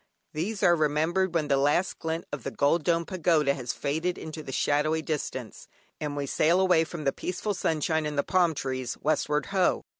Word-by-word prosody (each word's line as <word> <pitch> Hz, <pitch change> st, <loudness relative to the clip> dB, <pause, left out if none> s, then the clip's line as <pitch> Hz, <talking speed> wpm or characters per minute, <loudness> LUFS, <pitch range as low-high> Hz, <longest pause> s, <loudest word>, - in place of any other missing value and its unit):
These 195 Hz, +7 st, -3 dB
are 175 Hz, -, +6 dB
remembered 160 Hz, +4 st, +1 dB
when 155 Hz, -3 st, +1 dB
the 140 Hz, -1 st, +3 dB
last 145 Hz, +7 st, +1 dB
glint 160 Hz, +1 st, -3 dB
of 145 Hz, -, -3 dB
the -, -, -4 dB
golden 150 Hz, +3 st, +1 dB
domed 170 Hz, -1 st, +1 dB
pagoda 160 Hz, -5 st, +2 dB
has 125 Hz, -3 st, -4 dB
faded 160 Hz, +5 st, -2 dB
into 155 Hz, 0 st, -7 dB
the 135 Hz, -, -8 dB
shadowy 150 Hz, +4 st, +1 dB
distance, 130 Hz, -7 st, -4 dB, 0.3 s
and 145 Hz, -1 st, -4 dB
we 140 Hz, -, -1 dB
sail 165 Hz, +6 st, +2 dB
away 180 Hz, -4 st, +4 dB
from 165 Hz, -1 st, -7 dB
the 135 Hz, -, +1 dB
peaceful 185 Hz, +3 st, -3 dB
sunshine 160 Hz, -3 st, 0 dB
and 150 Hz, -1 st, -4 dB
the 140 Hz, -, +2 dB
palm 175 Hz, -4 st, +2 dB
trees, 130 Hz, -3 st, -3 dB
westward 150 Hz, -1 st, 0 dB
ho! 185 Hz, -2 st, +2 dB
155 Hz, 190 wpm, -27 LUFS, 145-175 Hz, 0.3 s, are